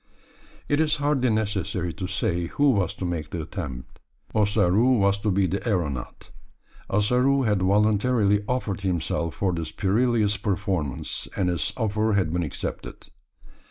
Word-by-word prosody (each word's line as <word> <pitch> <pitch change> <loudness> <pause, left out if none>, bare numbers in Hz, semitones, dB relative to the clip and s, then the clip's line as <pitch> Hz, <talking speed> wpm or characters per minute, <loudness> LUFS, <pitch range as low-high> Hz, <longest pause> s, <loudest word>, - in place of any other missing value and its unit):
It 145 - +1
is 155 -1 +3
hardly 145 -3 +1
necessary 100 -5 -1
to 95 -2 -5
say 90 -3 -1
who 145 +9 +3
was 100 -7 0
to 95 - -4
make 85 -3 -3
the 85 -2 -4
attempt 75 -8 -7 0.3
Ossaroo 105 +3 +3
was 100 -1 +2
to 105 - -1
be 95 0 +2
the 95 +2 -2
aeronaut. 75 - -3 0.6
Ossaroo 125 +7 +2
had 105 -5 +1
voluntarily 105 +1 +2
offered 110 -7 -2
himself 85 -3 -1
for 95 -2 0
this 80 -2 -4
perilous 105 +1 +1
performance; 95 - -2
and 90 -2 +1
his 85 -2 -1
offer 110 -1 0
had 95 -5 +1
been 90 - 0
accepted. 75 - -5
100 Hz, 145 wpm, -25 LUFS, 90-110 Hz, 0.6 s, is